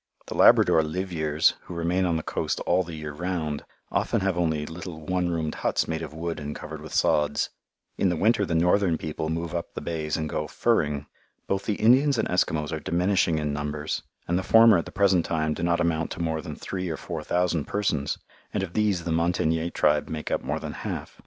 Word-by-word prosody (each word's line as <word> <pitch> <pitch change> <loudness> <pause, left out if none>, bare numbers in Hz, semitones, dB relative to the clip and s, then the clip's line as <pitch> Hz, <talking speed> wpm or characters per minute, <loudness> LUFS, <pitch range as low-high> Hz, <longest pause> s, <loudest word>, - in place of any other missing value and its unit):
The - - -6
Labrador 80 - +6
"liveyeres," 80 -2 +1
who 90 - -8
remain 85 +3 +1
on 85 -2 +1
the 80 - -4
coast - - -2
all 90 +2 +2
the 85 -2 -6
year 75 -1 -6
round, 80 -3 -3 0.3
often - - +1
have 95 -1 +1
only 80 -4 0
little 85 +1 -7
one 90 +2 -1
roomed 80 -2 -1
huts - - +1
made 80 0 -2
of 80 - -6
wood 80 0 -4
and 75 0 -5
covered - - -7
with - - -9
sods. 75 -1 +2 0.5
In 95 - +3
the 90 - +1
winter 110 +3 +3
the 85 -4 -1
northern 90 +1 +3
people 80 0 -4
move 85 +1 -3
up 85 -1 -4
the - - -2
bays 80 -3 -2
and 80 -1 -2
go - - -2
"furring." 75 -1 +1 0.4
Both 95 0 -1
the 105 - 0
Indians 130 +6 +4
and - - +1
Eskimos 80 -4 0
are 80 - -2
diminishing 90 +1 +1
in 75 -1 -1
numbers, 75 +1 -3 0.3
and 85 +1 +1
the - - -3
former 115 -3 +7
at - - -4
the - - -9
present 95 -4 +3
time 80 -2 0
do 80 - -6
not 85 0 +2
amount 80 -1 0
to - - -10
more 80 -2 -1
than 80 -3 -7
three 90 -2 -4
or 80 - -3
four - - -5
thousand 85 -4 0
persons 85 -9 -1 0.4
and 100 - +1
of 90 -3 -5
these 105 -5 +1
the 85 - -2
Montagnais 80 0 +1
tribe 75 -3 +2
make 75 -1 -4
up - - +1
more - - -2
than - - -6
half. - - -5
85 Hz, 215 wpm, -26 LUFS, 80-90 Hz, 0.5 s, former